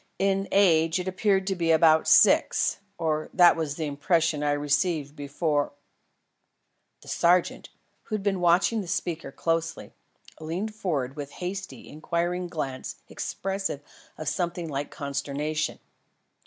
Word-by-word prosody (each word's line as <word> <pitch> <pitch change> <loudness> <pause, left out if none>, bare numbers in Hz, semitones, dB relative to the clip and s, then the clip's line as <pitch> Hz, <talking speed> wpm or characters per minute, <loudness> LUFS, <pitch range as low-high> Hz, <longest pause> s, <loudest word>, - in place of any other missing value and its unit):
In 195 0 +1
age 165 -3 +4
it 180 - -4
appeared 190 0 +1
to 195 0 -1
be 170 -2 -1
about 160 0 +5
six - - +4 0.2
or 155 -1 -1
that 175 -2 +7
was 155 -3 -3
the 160 - -3
impression 150 +1 +1
I 145 0 +1
received 145 0 0
before 145 0 -1 0.6
" - - -50
The - - -17
sergeant, 175 +1 +1 0.4
who 215 - -3
had 205 - -4
been 195 -2 0
watching 175 +6 +3
the 190 - -8
speaker 170 -3 -3
very - - -18
closely, 165 -1 -2 0.5
leaned 175 +7 -4
forward 145 -11 -2
with 145 -2 -6
a - - -14
hasty, 185 +1 -6
inquiring 175 +3 -2
glance 135 -6 -5
expressive 195 -6 -3 0.4
of 155 - -6
something 175 +1 -2
like 140 -1 -3
consternation. 140 +2 -3
165 Hz, 140 wpm, -26 LUFS, 150-185 Hz, 0.6 s, that